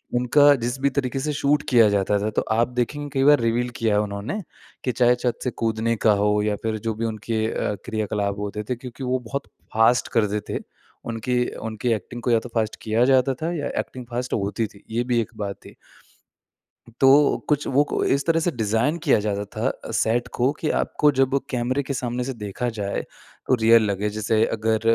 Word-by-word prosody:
उनका 145 +4 +5
जिस 125 +2 -2
भी 140 - +3
तरीके 135 -1 -2
से 150 +2 -2
शूट 145 +1 +1
किया 115 -4 +6
जाता 100 0 +1
था। 105 +2 -1
तो - - +4
आप 115 +2 +3
देखेंगे 125 +4 -3
कई 135 0 +2
बार 145 -1 +6
रिवील 115 +2 +1
किया 110 -2 +2
उन्होंने 105 - -4 0.4
कि 125 - 0
चाहे 125 +1 +3
छत 120 -1 -2
से 125 - -1
कूदने 115 +1 +1
का 110 - +7
हो 105 0 +2
या 105 -1 0
फ़िर 110 -1 -1
जो 110 - +1
भी 115 +1 -2
उनके 110 0 -2
अ, 105 - -2
क्रियाकलाप 105 -3 -2
होते 105 +1 -4
थे 125 - 0
क्योंकि 125 +2 -9
वो 130 0 0
बहुत 140 0 -4 0.3
फ़ास्ट 115 +3 +4
करते 105 -1 +1
थे। - - -2 0.5
उनकी 125 +2 0 0.2
उनकी 110 +2 -3
एक्टिंग 120 +4 -6
को 125 - +1
या 115 - +4
तो 120 - -10
फ़ास्ट 110 -1 0
किया 110 +2 +1
जाता 130 0 +3
था 165 +2 -1
या 145 - -2
एक्टिंग 125 -1 -5
फ़ास्ट 125 +1 -3
होती 105 +2 -1
थी। 100 - -19
ये 115 +2 0
भी 120 - +3
एक 110 - -5
बात 100 -2 -5
ही। - - -13 1.2
तो 140 +2 +5
कुछ 150 0 +1
वो 140 +2 +3
कु - - 0
इस 140 +1 +1
तरह 165 0 +3
से 175 +1 0
डिज़ाइन 115 +6 0
किया - - +4
जाता 105 -1 -2
था 110 +4 -4
सेट 115 +2 +1
को 125 +3 +2
कि 155 - -1
आपको 150 -1 +2
जब 135 +1 +3
कैमरे 130 +2 -1
के 140 - -3
सामने 125 -1 -2
से 135 +1 -4
देखा 110 +2 -4
जाए 100 -1 -2 0.5
तो 130 - +4
रियल 115 0 +6
लगे। 100 +2 -1
जैसे 110 +1 +1
अगर 110 0 0
120 Hz, 205 wpm, -23 LUFS, 110-130 Hz, 1.2 s, का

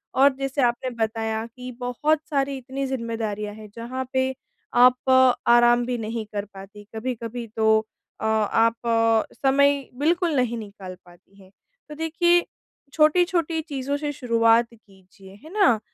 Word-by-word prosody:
और 275 +1 +5
जैसे 270 +1 -2
आपने 240 +1 0
बताया 220 0 -2
कि 250 +2 -10
बहुत 290 +5 0
सारी 275 -2 -1
इतनी 265 +2 -5
ज़िम्मेदारियाँ 225 -4 -4
हैं 215 -1 -12
जहाँ 250 +3 -5
पे 260 0 +1 0.4
आप 250 +1 +4 0.4
आराम 240 0 +5
भी 245 -1 -2
नहीं 225 0 -4
कर 205 0 -3
पाती। 195 +2 -12
कभी-कभी 235 0 -5
तो 220 0 +3 0.5
अ, - - -3
आप 220 +1 +2 0.6
समय 280 0 +2
बिल्कुल 335 +1 +1
नहीं 240 -2 0
निकाल 200 -4 -9
पाती 180 +3 -20
हैं। 185 - -19 0.4
तो 300 - -8
देखिए 345 +2 +2 0.5
छोटी-छोटी 330 +1 +2
चीज़ों 280 +1 -2
से 295 0 -3
शुरुआत 230 -2 +3
कीजिए। 195 -2 -18
है 315 - -12
ना? 390 - +4
245 Hz, 140 wpm, -24 LUFS, 220-280 Hz, 0.6 s, और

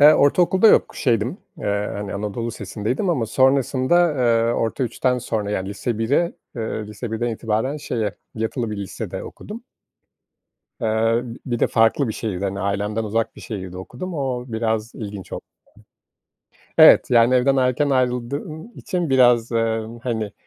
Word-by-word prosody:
Eee, 150 +2 +9
ortaokulda 180 +8 +4
yok, - - +4
şeydim, 120 - 0 0.2
eee, 100 0 -1
hani, 100 0 -5
anadolu 105 +3 -3
lisesindeydim 125 - -2
ama 125 -9 0
sonrasında, 135 +6 +3
eee 115 -3 +2
orta 115 +3 -1
3'ten 125 +2 0
sonra, 110 -4 -3
yani 95 -2 -2
lise 105 +3 -3
1'e, 140 +10 +1 0.2
eee 110 -2 -3
lise 105 +2 -7
1'den 120 +2 -1
itibaren 115 +4 -1
şeye, 110 -8 -3 0.2
yatılı 110 +1 -2
bir 105 - -4
lisede 100 -2 -5
okudum. 225 +3 -9 1.2
Eee, 115 +1 +1 0.2
bir 120 -2 -1
de - - +3
farklı 115 +3 +2
bir - - -1
şehirde, 100 -4 -4
hani, 100 0 -2
ailemden 105 +3 -1
uzak 115 +2 -1
bir - - -11
şehirde 95 -4 -6
okudum. 185 - -7
O 130 -4 -2
biraz 110 0 -2
ilginç 100 -4 -7
oldu. - - -5 1.4
Evet. - - +8
Yani 120 +1 +5
evden 135 +2 +3
erken 130 +2 +2
ayrıldığım 135 - -2
için 175 -5 -2
biraz, 120 -3 +4
eee, 115 -1 +1 0.2
hani, 110 -4 -2
115 Hz, 150 wpm, -22 LUFS, 110-130 Hz, 1.4 s, Eee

